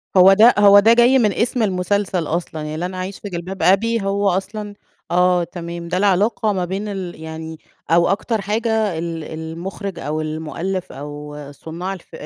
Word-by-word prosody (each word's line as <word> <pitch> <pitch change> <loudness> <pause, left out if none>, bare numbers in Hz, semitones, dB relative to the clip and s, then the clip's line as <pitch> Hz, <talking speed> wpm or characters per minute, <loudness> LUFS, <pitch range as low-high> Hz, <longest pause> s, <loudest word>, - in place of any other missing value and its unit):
هو 190 +1 +8
ده 225 +5 +7
هو 205 0 +8
ده 220 +3 +6
جاي 240 +3 +5
من 210 -4 +2
اسم 240 0 0
المسلسل 185 -3 0
أصلًا. 165 -1 -3
يعني 150 0 -5
لن 180 +3 -3
أعيش 185 +1 -5
في 205 - -7
جلباب 180 +2 -5
أبي 225 +4 +3
هو 200 +1 +1
أصلًا 205 +3 -3 0.4
آه 180 0 +3
تمام. 170 0 -7
ده 180 +2 -1
العلاقة 205 +2 +2
ما 185 -2 -1
بين 195 +4 -4
ال 185 -5 -6
يعني 160 0 -7 0.3
أو 170 +1 +4
أكتر 210 +3 -1
حاجة 215 -2 0
ال 165 -1 -4
المُخرج 170 +4 -6
أو 155 0 -3
المُؤلِّف 160 +4 -4
أو 145 +1 -8 0.2
صُنّاع 165 +6 -6
الفي 185 - -11
185 Hz, 170 wpm, -20 LUFS, 165-205 Hz, 0.4 s, هو